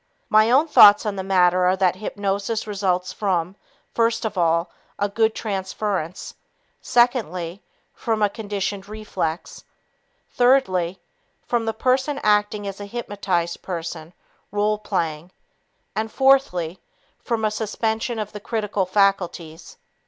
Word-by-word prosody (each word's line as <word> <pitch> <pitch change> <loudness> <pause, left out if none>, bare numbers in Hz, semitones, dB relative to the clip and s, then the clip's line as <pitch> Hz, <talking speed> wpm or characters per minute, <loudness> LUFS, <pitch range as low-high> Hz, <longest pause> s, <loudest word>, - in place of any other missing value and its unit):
My 215 +1 +5
own 275 +6 +4
thoughts 210 -7 +8
on 210 -2 -2
the 190 - -3
matter 185 -1 +3
are 185 +1 +3
that 185 -1 +2
hypnosis 205 +2 -2
results 185 -3 -1
from, 185 -3 -1 0.4
first 230 0 +1
of 215 - -3
all, 170 0 +1 0.3
a 205 - 0
good 220 +2 +1
transference; 190 -4 -3 0.5
secondly, 205 - +1 0.3
from 220 -2 -1
a - - +5
conditioned 205 -1 -4
reflex; 210 -6 -4 0.7
thirdly, 190 -9 +2 0.5
from 235 -2 0
the 225 - -1
person 260 +4 +1
acting 210 0 +2
as 195 0 -6
a - - -5
hypnotized 195 -6 -2
person 165 -2 -6 0.4
(role 210 +1 0
playing), 170 -5 -3 0.7
and, 220 0 -2
fourthly, 265 - +2 0.4
from 225 -3 -1
a 215 - +1
suspension 220 +2 -2
of 210 -1 -4
the 210 - -8
critical 210 -3 -2
faculties. 180 - -1
205 Hz, 125 wpm, -22 LUFS, 185-220 Hz, 0.7 s, thoughts